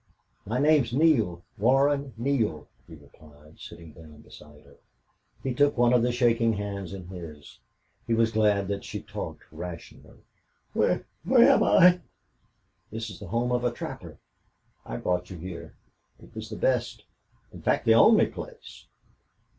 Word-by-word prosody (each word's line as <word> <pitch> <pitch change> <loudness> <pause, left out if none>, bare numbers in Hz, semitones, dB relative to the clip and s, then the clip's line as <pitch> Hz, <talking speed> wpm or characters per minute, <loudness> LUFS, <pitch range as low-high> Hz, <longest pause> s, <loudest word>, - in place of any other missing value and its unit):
"My 115 +4 -1
name's 145 -4 +3
Neale 120 - +2 0.2
Warren 135 +3 +2
Neale," 115 - -1 0.2
he 80 - -12
replied, 75 +1 -19
sitting 85 -2 -11
down 75 -2 -15
beside 75 0 -16
her. 70 0 -20 0.7
He 130 - -2
took 145 +2 +2
one 120 0 +4
of 125 - +4
the 125 +1 +1
shaking 115 -2 +2
hands 100 -3 -5
in 95 -2 -8
his. 80 -6 -11 0.5
He 115 - +1
was 115 0 +2
glad 105 -3 +2
that 100 0 -3
she - - -7
talked - - -7
rationally. 90 -2 -10 0.5
"Where - - +1 0.3
am - - +6
I?" 180 - +5 0.9
"This 110 0 -6
is 90 - -11
the - - -9
home 120 +2 -1
of 125 0 0
a 120 - +1
trapper. 120 - -8 0.7
I - - -5
brought 90 0 -2
you 90 - -8
here. 90 +1 -9 0.4
It - - -17
was - - -8
the - - -6
best - - -1 0.5
in - - -11
fact, - - 0
the 115 - +6
only 215 - +6
place." 475 -2 -11
110 Hz, 155 wpm, -26 LUFS, 85-125 Hz, 0.9 s, am